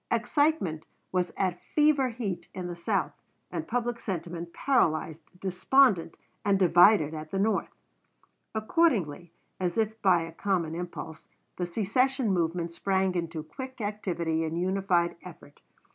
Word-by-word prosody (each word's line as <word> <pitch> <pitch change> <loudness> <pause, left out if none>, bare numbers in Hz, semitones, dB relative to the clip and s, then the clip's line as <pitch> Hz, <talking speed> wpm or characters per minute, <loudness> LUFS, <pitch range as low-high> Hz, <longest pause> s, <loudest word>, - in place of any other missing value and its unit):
Excitement 290 - +1 0.3
was 180 -1 0
at 185 -2 -1
fever 295 -4 +4
heat 195 -8 -4
in 185 -1 -4
the 175 -1 -4
South, 170 - -1 0.4
and - - -4
public 240 0 -1
sentiment 170 -4 -5
paralyzed, 165 - +1 0.2
despondent, 190 -1 +3 0.3
and 200 -1 +3
divided 175 -2 +5
at 155 0 -6
the 195 - -3
North. 205 0 +1 0.9
Accordingly, 215 - +1 0.3
as 180 0 -1
if 220 0 -1
by 180 -4 +4
a 165 - -7
common 175 -4 -1
impulse, 170 -2 -7 0.3
the 180 - -2
secession 230 +4 +1
movement 170 -1 -1
sprang 190 +1 +1
into 165 -3 -3
quick 260 - -8
activity 175 -6 -1
and 165 +1 -2
united 180 -2 +1
effort. 160 -5 -13
185 Hz, 130 wpm, -28 LUFS, 170-220 Hz, 0.9 s, divided